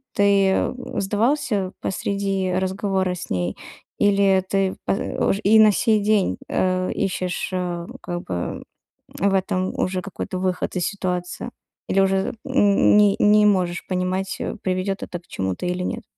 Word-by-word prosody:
Ты, 200 -1 +4
э, - - +1 0.3
сдавался 210 -1 0
посреди 195 -1 -1
разговора 190 0 0
с 180 - -8
ней, 90 0 -1 0.4
или 195 -2 +3
ты 195 -1 0
по - - +1
ож 195 - -1
и 220 +2 +6
на 215 -1 +7
сей 215 0 +2
день, 210 -2 +2
э, 185 0 0
ищешь, 185 -2 -2
э, 175 -2 -3 0.2
как 175 0 -4
бы 90 -1 -4 0.5
в 195 +1 0
этом 185 -1 0
уже 185 0 -1
какой-то 195 -1 -5
выход 185 0 -2
из 175 - 0
ситуации, 180 +3 -3 0.4
или 195 - +2
уже, 195 +1 +1
м, 265 - -5
м, 205 -3 +4
ни 205 -1 +5
не 210 0 +5
можешь 180 -4 +1
понимать, 185 +1 -2
э, - - -3
приведёт 185 +1 -1
это 175 - -5
к 175 - -30
чему-то 95 - -3
или 180 +1 -2
нет? 235 +5 -4
190 Hz, 155 wpm, -22 LUFS, 180-200 Hz, 0.5 s, на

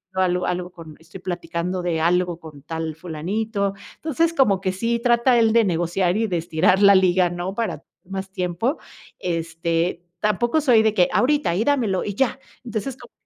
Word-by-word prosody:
algo 180 -1 +1
algo 180 0 -2
con 165 -4 -12
estoy 170 +3 -13
platicando 175 0 -3
de 170 -2 -1
algo 175 0 +1
con 150 -3 -12
tal 160 0 -4
fulanito". 195 +5 -2 0.2
Entonces, 325 +2 0
como 210 - +3
que 185 -1 -2
sí 230 +5 -1
trata 240 0 +3
él 225 -1 +3
de 230 -1 +5
negociar 175 +1 0
y 225 0 +1
de 175 -3 -1
estirar 175 +4 +2
la 200 0 +8
liga, 185 -1 +4
¿no?, 175 +2 -4
para 205 -9 -3 0.2
más 190 +1 -6
tiempo. 180 - -1 0.4
Este, 165 0 -2 0.2
tampoco 235 - +1
soy 245 -6 +5
de 220 -1 +2
que: 180 -4 +3
"Ahorita, 290 - +2
y 210 - +1
dámelo, 235 -10 +1
y 205 - -3
ya". 265 +2 0 0.2
Entonces, 230 +2 -4
como - - -15
185 Hz, 175 wpm, -22 LUFS, 175-225 Hz, 0.4 s, la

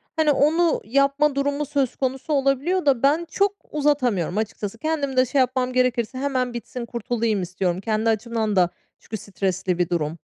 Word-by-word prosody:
Hani, 310 -2 +3
onu 320 +4 +3
yapma 275 +4 +2
durumu 285 +1 0
söz 275 -3 -1
konusu 265 +3 -2
olabiliyor 280 +6 +1
da 270 -3 +2
ben 305 +5 +3
çok 400 0 +1 0.2
uzatamıyorum, 250 - +1
açıkçası. 215 0 -3
Kendim 285 -2 -2
de 255 - +5
şey 270 +2 0
yapmam 255 0 +1
gerekirse 250 -1 +1
hemen 255 -3 -1
bitsin, 235 0 -6
kurtulayım 230 -3 -1
istiyorum. 180 0 -2
Kendi 220 +1 0
açımdan 220 -1 -1
da 180 -2 +4 0.3
çünkü 220 - -6
stresli 190 -2 -2
bir 175 -1 0
durum. 160 -1 -1
255 Hz, 165 wpm, -23 LUFS, 215-280 Hz, 0.3 s, de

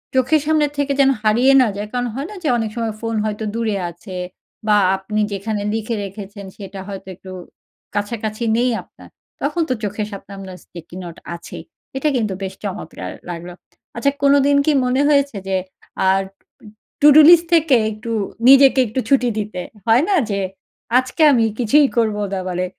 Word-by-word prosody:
চোখের 260 +4 +3
সামনে 310 -1 +3
থেকে 285 0 0
যেন 270 - +5
হারিয়ে 240 +5 +4
না 250 - +3
যায়। 210 +1 -4
কারণ 245 0 -1
হয় 275 +4 -4
না 420 - -9
যে 310 - -1
অনেক 225 -2 -2
সময় 230 -2 -2
ফোন 225 -1 -2
হয়তো 215 0 -3
দূরে 225 -3 -1 0.2
আছে 185 +3 -11 0.5
বা 210 -1 +5 0.2
আপনি 210 +3 -4
যেখানে 205 +1 -3
লিখে 225 +1 -2
রেখেছেন 200 +1 -9
সেটা 195 -1 -8
হয়তো 195 -1 -8
একটু 185 +1 -12 0.6
কাছাকাছি 215 +2 -3
নেই 245 +1 +2
আপনার। - - -18 0.3
তখন 345 - -1
তো 255 - +2
চোখের 205 +1 -3
সামনে 200 0 -10
আপনার 190 -2 -9
স্টিকি 170 0 -12
নোট 170 -2 -9 0.2
আছেই। 170 - -9 0.3
এটা 300 +3 +1
কিন্তু 215 -5 -1
বেশ 190 0 -4
চমৎকার 200 0 -6 0.2
লাগলো। 175 +1 -6 0.4
আচ্ছা, 255 +4 +1
কোনোদিন 280 0 +4
কি 310 - +3
মনে 255 +2 +1
হয়েছে 280 -6 +2
যে 190 - 0 0.6
আড 195 0 +1 0.8
টুডু 295 +1 +8
লিস্ট 340 -1 +7
থেকে 305 -5 +4
একটু 215 +2 -7 0.4
নিজেকে 270 0 +7
একটু 230 +5 -3
ছুটি 255 -3 +3
দিতে? 205 -4 -4 0.3
হয় 230 +5 +5
না 400 - +3 0.2
যে 200 - -1 0.6
আজকে 255 +5 -4
আমি 235 -4 +3
কিছুই 275 +5 +4
করবো 215 -2 +1
না 195 - -1
বলে 180 0 -1
225 Hz, 170 wpm, -19 LUFS, 200-270 Hz, 0.8 s, টুডু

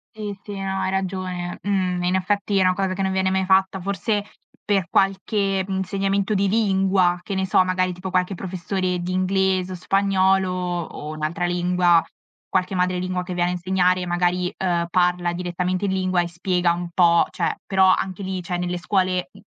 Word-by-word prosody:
Sì, 210 -2 -5
sì, 205 -2 -7
no, 195 0 -2
hai - - -1
ragione. 185 -2 -3
Mhmm, 185 -3 0
in 180 +1 +1
effetti 200 +2 0
è - - +4
una 185 0 +4
cosa 190 0 -1
che 195 +1 -2
non 190 - 0
viene 190 0 +1
mai 190 0 0
fatta. 190 0 +3
Forse 200 +3 -1 0.4
per 195 -4 +1
qualche, 195 0 +1
mhmm, 195 - -2
insegnamento 195 +2 0
di 200 0 +2
lingua, 190 -4 +2
che 195 - -5
ne 190 - 0
so, 190 0 +4
magari 185 0 0
tipo 180 +2 -6
qualche 185 +1 0
professore 185 0 -2
di 175 +1 -4
inglese, 185 0 +1
o - - -5
spagnolo, 190 0 +2
o 175 -4 -4
un'altra 155 +3 -2
lingua, 175 -1 +3 0.5
qualche 185 0 0
madre 180 0 +1
lingua 185 0 -2
che 180 0 -6
viene 175 0 +1
a - - -2
insegnare 180 0 +1
magari, 180 +1 0
uhm, 175 -2 0
parla 180 -1 +1
direttamente 180 +2 -2
in 195 - 0
lingua 185 -1 +1
e 175 - -2
spiega 175 0 0
un 175 0 -5
po' 170 -1 +5
cioè, - - -1
però 190 -1 +4
anche 190 +1 -4
lì, 190 -1 -3
cioè, 175 0 -3
nelle 180 0 -2
scuole, 185 +1 0
m - - -15
185 Hz, 190 wpm, -22 LUFS, 180-190 Hz, 0.5 s, po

